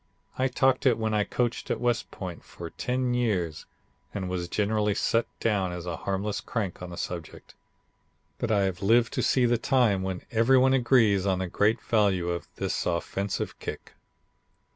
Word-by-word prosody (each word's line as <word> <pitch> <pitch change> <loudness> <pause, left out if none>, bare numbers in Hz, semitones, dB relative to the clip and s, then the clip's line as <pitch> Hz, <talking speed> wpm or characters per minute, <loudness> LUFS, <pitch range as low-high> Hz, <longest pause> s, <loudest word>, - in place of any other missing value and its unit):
I 130 - +1
talked 130 +1 +2
it 120 - +4
when 110 -1 -1
I 105 -1 +3
coached 120 +2 -2
at - - -1
West 120 -1 0
Point 90 -3 -7
for 85 -1 -9
ten 125 0 -1
years 95 -10 -1 0.5
and 95 -2 -2
was 90 -1 -2
generally 105 +1 0
set 115 +2 +1
down 100 -5 +1
as 90 -1 -6
a 85 -2 -3
harmless 100 +4 -2
crank 100 -8 -3
on 90 - -6
the 85 - -8
subject, 85 -2 -6 0.9
but 120 - -1
I 105 -3 +3
have 95 -2 -2
lived 115 +3 +3
to - - 0
see 130 -2 +3
the 120 -1 +2
time 120 -8 +2
when 95 -1 -4
every 115 +3 +4
one 130 +1 +4
agrees 115 -7 +3
on 95 -1 +2
the 95 - -2
great 105 +6 +2
value 100 -6 +1
of 85 0 -3
this - - -2
offensive 95 +3 -2
kick. - - -7
105 Hz, 180 wpm, -27 LUFS, 95-120 Hz, 0.9 s, it